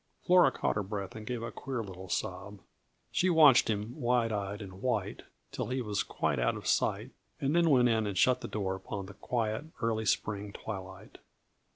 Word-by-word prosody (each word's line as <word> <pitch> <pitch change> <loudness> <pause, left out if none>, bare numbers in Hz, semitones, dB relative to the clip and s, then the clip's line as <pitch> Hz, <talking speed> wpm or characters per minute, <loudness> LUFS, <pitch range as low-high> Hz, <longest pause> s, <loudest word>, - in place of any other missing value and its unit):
Flora 180 0 +6
caught - - -1
her - - +1
breath 100 -1 -5
and 110 -1 -8
gave 120 -2 -3
a 115 - -4
queer 130 -4 -4
little 95 -2 -9
sob. 100 +4 -3 0.5
She 185 - +2
watched 150 -7 +7
him, 105 +2 -2
wide 120 -1 +2
eyed 100 -1 -3
and 95 -2 -9
white, 105 -6 -1 0.3
till - - -3
he 130 +1 -2
was 105 -4 -1
quite 75 -4 -1
out - - +1
of - - -10
sight - - +1 0.3
and 140 +3 0
then 170 -1 +4
went 125 -4 +5
in 110 -2 +1
and 100 -2 -3
shut 125 +5 +4
the - - -5
door 95 -3 -2
upon 95 +1 -6
the 100 - -10
quiet, 110 +5 -2
early 110 -1 0
spring 100 0 -1
twilight. 95 +1 -8
110 Hz, 195 wpm, -31 LUFS, 100-125 Hz, 0.5 s, watched